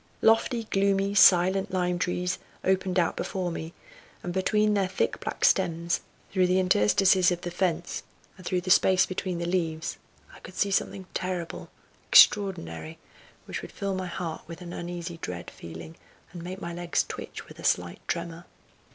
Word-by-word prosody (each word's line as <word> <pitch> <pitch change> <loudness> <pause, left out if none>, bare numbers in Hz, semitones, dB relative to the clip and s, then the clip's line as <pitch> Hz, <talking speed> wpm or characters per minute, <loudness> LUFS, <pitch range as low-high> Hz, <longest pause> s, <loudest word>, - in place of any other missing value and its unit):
Lofty, 225 +1 +3
gloomy, 195 -1 +1
silent 190 0 +5
lime 180 -1 0
trees 180 0 -1 0.2
opened 190 -1 +1
out 170 -2 +2
before 185 -2 -3
me, 165 0 -5 0.5
and 175 - -4
between 210 +3 +2
their 195 -2 +1
thick 185 - -1
black - - -2
stems, 170 +1 +2 0.3
through 185 -2 +3
the 185 +1 +3
interstices 185 - +4
of 175 0 -2
the 175 - -5
fence, 175 -1 -1 0.3
and 185 - -14
through 180 +1 -1
the 185 +1 -2
space 185 0 +5
between 185 -1 -3
the 170 - -3
leaves 165 -3 -2 0.4
I - - -13
could 185 - -12
see 200 +1 +1
something 190 0 -1
terrible, 180 -2 -4 0.4
extraordinary, 80 - +4 0.5
which - - -5
would - - -9
fill 200 -1 -3
my 185 -1 -3
heart 170 -2 -5
with 165 0 -9
an 175 0 -8
uneasy 175 0 -5
dread 90 - -6
feeling, 85 - -10 0.4
and 175 - -7
make 185 +2 -6
my 170 -2 -5
legs 175 0 0
twitch - - -7
with - - -14
a - - -10
slight 90 -1 0
tremor. 170 0 -4
180 Hz, 170 wpm, -27 LUFS, 170-190 Hz, 0.5 s, silent